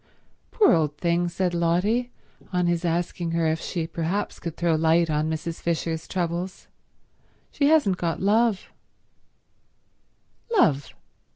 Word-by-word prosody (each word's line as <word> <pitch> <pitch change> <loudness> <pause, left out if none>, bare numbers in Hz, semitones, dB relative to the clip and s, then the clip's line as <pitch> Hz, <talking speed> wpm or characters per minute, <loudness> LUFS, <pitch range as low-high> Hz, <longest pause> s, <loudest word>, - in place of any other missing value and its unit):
"Poor 425 - +4
old 150 -2 +1
thing," 175 +1 +1
said 180 +1 -1
Lotty, 180 +9 +1 0.4
on 180 -1 +1
his 175 0 0
asking 170 0 -1
her 165 -1 +1
if 160 0 0
she 170 -3 -3
perhaps 170 +5 -3
could 170 -2 -6
throw 170 -1 +1
light 160 +1 +3
on 150 +1 0
Mrs. 160 +1 -4
Fisher's 165 -1 -2
troubles. 175 +1 -3 0.8
"She 285 - +1
hasn't 290 - +3
got 170 -2 -2
love." 210 +1 +1
170 Hz, 120 wpm, -25 LUFS, 165-185 Hz, 0.8 s, Poor